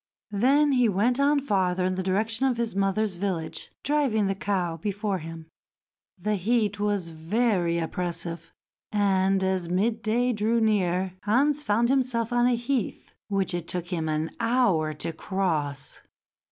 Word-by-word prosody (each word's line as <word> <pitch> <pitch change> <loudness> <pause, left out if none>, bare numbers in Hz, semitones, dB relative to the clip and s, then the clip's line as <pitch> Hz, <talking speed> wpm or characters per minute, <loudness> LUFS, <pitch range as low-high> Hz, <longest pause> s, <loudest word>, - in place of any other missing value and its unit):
Then 275 +8 +3
he 250 -4 +3
went 225 +7 +1
on 285 +1 +4
farther 185 -8 0
in 185 - +1
the 185 - -2
direction 220 +7 0
of 250 -3 0
his 230 -3 -2
mother's 195 0 0
village, 175 -4 -3
driving 275 -8 +1
the 195 - +1
cow 185 -4 -1
before 205 +2 -2
him. 165 0 -8 0.7
The 210 +3 -1
heat 210 +1 +1
was 205 -4 0
very 175 +1 0
oppressive, 170 0 -4 0.4
and, 195 -2 +2
as 190 -2 -1
midday 220 +5 +1
drew 220 +2 +1
near, 190 -4 +1
Hans 280 +7 +2
found 235 -2 +1
himself 250 -3 +1
on 240 0 +4
a 250 - +3
heath 240 -2 -3
which 195 -2 -1
it 175 -1 -3
took 175 -1 -3
him 165 -4 -2
an 155 +1 -1
hour 230 -10 +2
to 160 +2 -4
cross. 160 -7 -2
200 Hz, 150 wpm, -26 LUFS, 180-235 Hz, 0.7 s, on